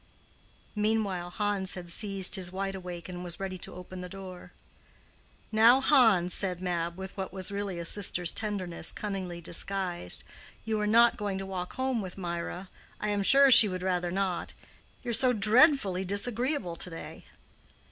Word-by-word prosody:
Meanwhile 210 -4 -1
Hans 200 0 0
had 180 -2 -8
seized 195 +1 -2
his 185 -3 +1
wide 195 +1 -3
awake, 180 -2 -8
and 180 -1 -7
was 175 -2 -6
ready 190 -1 -5
to - - -9
open 180 0 -9
the 180 - -8
door. 185 -1 -10 1.0
"Now, 230 +4 +6
Hans," 225 - +4
said 185 -3 0
Mab, 170 -2 -3
with 190 0 -8
what 190 -1 -5
was 190 0 -3
really 200 -2 -4
a 170 - -5
sister's 180 -2 +2
tenderness 190 -6 -4
cunningly 185 -4 -5
disguised, 175 - -3 0.4
"you 220 -1 -1
are 210 - -1
not 230 +2 +5
going 200 -2 -3
to 195 - -5
walk 185 -2 -6
home 260 -3 -1
with 185 -1 -7
Mirah. 175 +1 -5 0.3
I 210 - -2
am 205 -1 0
sure 275 +6 +6
she 225 -3 +10
would 185 -1 -5
rather 180 -2 -1
not. 185 -1 -3 0.5
You 245 - -3
are - - -2
so 250 +2 +4
dreadfully 215 - +4
disagreeable 215 - -1
to 180 - -3
day." 165 - -10
190 Hz, 165 wpm, -28 LUFS, 180-210 Hz, 1.0 s, she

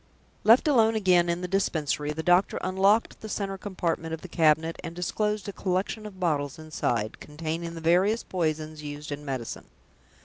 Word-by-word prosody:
Left 230 +7 +6
alone 225 -6 +4
again 180 -5 +4
in 170 +1 -1
the 180 - -3
Dispensary, 155 -6 0
the 160 +2 -4
doctor 180 +3 +3
unlocked 195 +4 +2
the 215 - -7
center 195 -2 -2
compartment 170 -4 -2
of 160 - -15
the - - -8
cabinet, 160 -1 +2
and 165 0 -6
disclosed 210 +4 -1
a 200 - -4
collection 190 +3 -2
of 190 -3 -12
bottles 145 -6 0
inside, 120 -8 -2
containing 165 +2 -5
the 165 - -7
various 185 +7 +3
poisons 155 -3 -2
used 150 0 -7
in 145 +1 -5
medicine. 130 -5 -5
170 Hz, 170 wpm, -27 LUFS, 155-195 Hz, -, Left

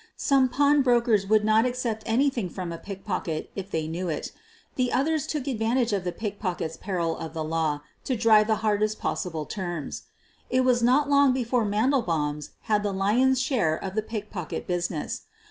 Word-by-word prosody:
Some 270 -2 +3
pawn 285 +3 +4
brokers 235 -6 +3
would 215 0 +3
not 215 +1 +4
accept 245 -3 -2
anything 240 -4 +1
from 180 -1 -5
a 165 - -7
pickpocket 195 -5 -4
if 195 -1 -5
they 160 -4 -2
knew 175 +3 -3
it. 155 - -3 0.4
The 250 -1 0
others 305 +2 +1
took 300 -4 -3
advantage 235 -2 0
of 195 -3 0
the 180 - -1
pickpocket's 190 -6 -4
peril 170 -4 -2
of 160 0 -7
the 160 - -2
law 155 -2 -1 0.2
to 260 - 0
drive 215 -1 +5
the 220 - +3
hardest 215 0 +1
possible 165 -5 -3
terms. 175 -6 -5 0.4
It 255 - +3
was 250 -1 +3
not 260 +5 +4
long 280 -2 +5
before 245 -2 0
Mandelbaum 205 - +1
's - - -9
had 210 -1 +1
the 205 -1 -1
lion's 240 +7 +3
share 250 - +1
of 190 +3 -6
the 215 - 0
pickpocket 210 -6 -5
business. 175 -1 -2
215 Hz, 180 wpm, -26 LUFS, 180-250 Hz, 0.4 s, drive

